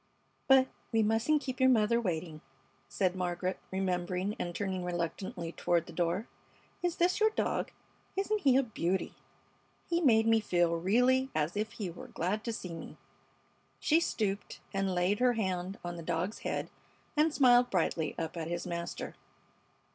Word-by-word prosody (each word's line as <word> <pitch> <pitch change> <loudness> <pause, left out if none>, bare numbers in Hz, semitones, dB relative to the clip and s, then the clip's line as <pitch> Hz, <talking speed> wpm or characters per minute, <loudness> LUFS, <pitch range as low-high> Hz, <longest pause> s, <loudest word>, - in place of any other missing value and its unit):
"But 265 -1 +6 0.2
we 225 -1 +3
mustn't 225 +8 +2
keep 260 -2 -4
your 260 0 +6
mother 235 -1 +3
waiting," 160 -5 -3 0.5
said 185 -2 0
Margaret, 180 0 -2
remembering 185 +1 -1
and 175 -1 -3
turning 190 -3 -2
reluctantly 175 0 -3
toward 170 -1 +1
the 170 - -11
door. 175 +6 0 0.5
"Is 350 -1 0
this 355 +1 +2
your 435 0 +5
dog? 435 - -1 0.5
Isn't 415 +2 0
he 265 -5 +5
a 275 - +4
beauty? 190 -5 -1 0.7
He 340 0 +1
made 225 -7 +5
me 225 0 +5
feel 175 -5 +2
really 250 +9 +3
as 155 +4 0
if 215 +2 -2
he 205 -6 -4
were 170 - -10
glad 200 +6 -2
to 230 - -1
see 180 -6 -6
me." 165 - -8 0.8
She 320 +2 +4
stooped 205 -10 -2
and 195 -1 0
laid 180 +3 +2
her 250 0 +4
hand 190 -3 -2
on 175 0 -4
the - - -6
dog's 170 +6 -2
head - - -3 0.4
and 310 +2 +4
smiled 245 -3 +5
brightly 165 -4 0
up 160 0 -3
at 165 -2 -3
his 175 +1 -3
master. 170 -1 -4
195 Hz, 160 wpm, -31 LUFS, 175-245 Hz, 0.8 s, But